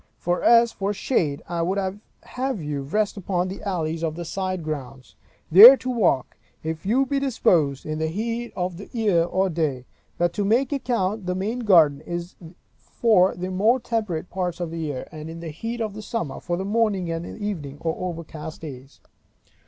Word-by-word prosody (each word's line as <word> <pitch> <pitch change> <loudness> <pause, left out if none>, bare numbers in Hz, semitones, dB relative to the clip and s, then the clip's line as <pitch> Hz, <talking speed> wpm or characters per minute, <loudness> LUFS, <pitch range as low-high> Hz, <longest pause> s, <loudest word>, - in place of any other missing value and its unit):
For 175 +1 -1
as 235 0 +5
for 200 +1 -2
shade, 160 - -1
I 170 -1 -2
would 185 +4 0
have 210 +5 -4
you 150 -3 -3
rest 205 +10 -1
upon 180 -1 -1
the 195 - -7
alleys 165 -5 -2
of 160 -1 -1
the 170 0 -6
side 185 0 -3
grounds, 135 -4 -6 0.4
there 225 +10 +11
to 255 - -4
walk, 180 - +1 0.3
if 160 +3 -4
you 260 +6 +3
be 275 +1 0
disposed, 175 - +1
in 155 0 -3
the 160 - 0
heat 230 +7 -3
of 180 -1 -3
the 200 - -10
year 205 -8 +2
or 185 +3 0
day; 155 -7 -2 0.3
but 175 0 +1
to 205 - -1
make 240 +7 +2
account, 220 -7 -1
that 180 - 0
the - - -3
main 220 +6 -2
garden 165 -10 +5
is 175 +1 -5 0.4
for 195 -5 +2
the 180 +1 -4
more 215 +7 +3
temperate 215 -9 -3
parts 180 -2 -2
of 175 -2 -3
the 165 - -5
year; 145 -5 -4
and 155 -1 -8
in 165 +1 -8
the 165 -1 -6
heat 225 +10 -5
of 215 -1 -4
summer, 205 - -4
for 175 -1 -3
the 190 - -3
morning 205 -5 0
and 165 0 -3
the - - -8
evening, 165 -10 -5
or 165 -1 -2
overcast 160 -2 -8
days. 135 -3 -10
180 Hz, 190 wpm, -24 LUFS, 160-215 Hz, 0.4 s, there